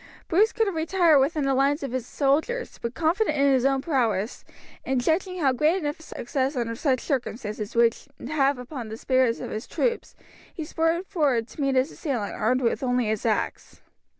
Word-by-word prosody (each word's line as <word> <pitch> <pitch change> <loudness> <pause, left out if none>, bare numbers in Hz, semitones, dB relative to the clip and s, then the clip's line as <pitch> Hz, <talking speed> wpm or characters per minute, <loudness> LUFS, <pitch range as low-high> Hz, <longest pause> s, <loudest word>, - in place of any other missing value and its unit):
Bruce 415 +7 +3
could 450 - +1
have 395 -4 -2
retired 325 -1 +4
within 295 +2 +1
the 275 0 +1
lines 280 +3 +2
of 275 - -4
his 255 -1 -3
soldiers; 315 - 0
but 235 +1 -4
confident 325 0 +1
in 280 0 +4
his 260 -1 +2
own 270 -1 +2
prowess, 235 - 0 0.4
and 265 -1 0
judging 355 +8 0
how 275 -5 +3
great 305 +7 +2
an 350 - -4
effect 290 +1 -3
a - - -11
success 265 +3 -1
under 235 -2 -1
such 260 -1 0
circumstances 225 -6 -3
would 235 0 +4 0.3
have 280 -2 +2
upon 250 -2 -7
the 220 - -6
spirits 255 -2 +2
of - - -6
his 215 - -5
troops, 475 -1 -2 0.4
he 320 - -6
spurred 325 +3 0
forward 285 - +1
to 295 - -9
meet 275 -1 +1
his 260 +4 +2
assailant 245 - -3
armed 250 +4 +1 0.2
only 250 -1 +1
with - - -1
his 220 +1 -1
axe. 220 - -2
275 Hz, 200 wpm, -25 LUFS, 245-315 Hz, 0.4 s, retired